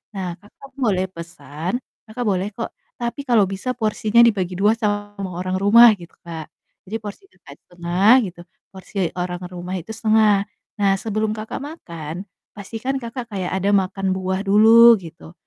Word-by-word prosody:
Nah, 180 Hz, -3 st, -4 dB
Kakak 215 Hz, +7 st, -16 dB
boleh 195 Hz, -7 st, +1 dB
pesan, 170 Hz, -, -5 dB, 0.3 s
Kakak 240 Hz, +3 st, -5 dB
boleh 190 Hz, -1 st, 0 dB
kok, 230 Hz, -, -5 dB, 0.3 s
tapi 240 Hz, +3 st, -3 dB
kalau 230 Hz, -4 st, +4 dB
bisa 195 Hz, +7 st, -4 dB
porsinya 220 Hz, 0 st, +2 dB
dibagi 190 Hz, -5 st, 0 dB
2 210 Hz, +2 st, +4 dB
sama 205 Hz, -2 st, -2 dB
orang 185 Hz, 0 st, -2 dB
rumah, 230 Hz, +4 st, +8 dB
gitu 170 Hz, -1 st, -13 dB
Kak. 160 Hz, -2 st, -7 dB, 0.4 s
Jadi 220 Hz, -, -4 dB
porsi 210 Hz, -, -8 dB
Kakak -, -, -15 dB
1/2 175 Hz, +4 st, +1 dB, 0.2 s
gitu, 175 Hz, 0 st, -14 dB, 0.3 s
porsi 190 Hz, -1 st, -3 dB
orang 180 Hz, 0 st, -3 dB
rumah 180 Hz, 0 st, -7 dB
itu 170 Hz, -, -14 dB
1/2. 215 Hz, -2 st, +3 dB, 0.4 s
Nah, 195 Hz, -, +4 dB
sebelum 215 Hz, 0 st, -1 dB
Kakak 220 Hz, +5 st, -6 dB
makan, 170 Hz, -, -8 dB, 0.3 s
pastikan 225 Hz, +6 st, -4 dB
Kakak 235 Hz, 0 st, -6 dB
kayak 190 Hz, -3 st, -3 dB
ada 190 Hz, +1 st, 0 dB
makan 190 Hz, 0 st, 0 dB
buah 190 Hz, 0 st, -2 dB
dulu 225 Hz, +4 st, +8 dB
gitu. 165 Hz, -2 st, -12 dB
200 Hz, 155 wpm, -21 LUFS, 180-220 Hz, 0.4 s, rumah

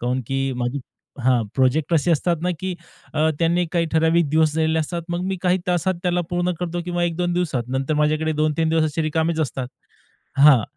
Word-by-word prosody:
कारण 125 Hz, +2 st, -1 dB
की 135 Hz, +2 st, -1 dB, 0.2 s
माझे 125 Hz, +3 st, -2 dB, 0.4 s
हां. 125 Hz, -2 st, +3 dB
प्रोजेक्ट 140 Hz, +5 st, +2 dB
असे 165 Hz, +2 st, +2 dB
असतात 170 Hz, +2 st, +1 dB
ना, 180 Hz, -, +1 dB
की 185 Hz, -1 st, -3 dB, 0.4 s
अ, 155 Hz, +1 st, +3 dB
त्यांना 170 Hz, +1 st, +2 dB
काही 170 Hz, -2 st, +1 dB
ठराविक 160 Hz, 0 st, +3 dB
दिवस 155 Hz, 0 st, +3 dB
दिलेले 160 Hz, 0 st, +2 dB
असतात. 170 Hz, +2 st, -2 dB
मग 175 Hz, +1 st, -2 dB
मी 190 Hz, -, -1 dB
काही 180 Hz, 0 st, +3 dB
तासात 180 Hz, +1 st, +1 dB
त्याला 180 Hz, -1 st, +1 dB
पूर्ण 175 Hz, 0 st, 0 dB
करतो, 175 Hz, 0 st, -2 dB
किंवा 175 Hz, -1 st, -2 dB
1-2 175 Hz, +1 st, -1 dB
दिवसात. 170 Hz, -8 st, 0 dB
नंतर 135 Hz, +3 st, -1 dB
माझ्याकडे 155 Hz, +1 st, +1 dB
2-3 155 Hz, +1 st, +1 dB
दिवस 160 Hz, -1 st, +1 dB
रिकामेच 160 Hz, +1 st, 0 dB
असतात. 130 Hz, -4 st, -2 dB, 0.7 s
हां. 140 Hz, -5 st, +7 dB
160 Hz, 185 wpm, -22 LUFS, 150-175 Hz, 0.7 s, हां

